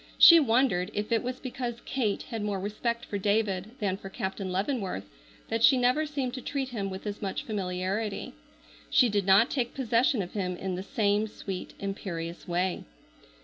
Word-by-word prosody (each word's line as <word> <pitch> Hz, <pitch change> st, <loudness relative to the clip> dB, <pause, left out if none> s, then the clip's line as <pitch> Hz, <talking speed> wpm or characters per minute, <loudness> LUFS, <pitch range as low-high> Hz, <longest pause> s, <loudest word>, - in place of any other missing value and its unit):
She 335 Hz, -1 st, +10 dB
wondered 230 Hz, -, +2 dB
if 210 Hz, +2 st, -2 dB
it 230 Hz, -, +3 dB
was 255 Hz, +1 st, -4 dB
because 245 Hz, -2 st, -4 dB
Kate 220 Hz, -7 st, -1 dB
had 225 Hz, -2 st, -5 dB
more 205 Hz, -2 st, -1 dB
respect 235 Hz, +4 st, -2 dB
for 205 Hz, -, -3 dB
David 205 Hz, 0 st, 0 dB
than 200 Hz, -6 st, -1 dB
for 195 Hz, -, -9 dB
Captain 190 Hz, 0 st, -4 dB
Leavenworth 195 Hz, -, -2 dB, 0.4 s
that 225 Hz, 0 st, 0 dB
she 265 Hz, -, +7 dB
never 250 Hz, +5 st, +2 dB
seemed 275 Hz, -4 st, -2 dB
to 255 Hz, -, -5 dB
treat 270 Hz, -1 st, -3 dB
him 205 Hz, -6 st, -3 dB
with 190 Hz, +2 st, -7 dB
as 205 Hz, 0 st, -4 dB
much 195 Hz, -2 st, -3 dB
familiarity. 195 Hz, +1 st, -2 dB, 0.6 s
She 250 Hz, -, +5 dB
did 205 Hz, -2 st, 0 dB
not 195 Hz, +6 st, +6 dB
take 245 Hz, -4 st, -1 dB
possession 240 Hz, -3 st, +2 dB
of 180 Hz, -, -9 dB
him 180 Hz, -3 st, -2 dB
in 190 Hz, 0 st, -3 dB
the 180 Hz, -, -3 dB
same 205 Hz, +1 st, +1 dB
sweet 195 Hz, -3 st, -6 dB
imperious 175 Hz, -4 st, -5 dB
way. 180 Hz, +1 st, 0 dB
210 Hz, 180 wpm, -28 LUFS, 190-240 Hz, 0.6 s, She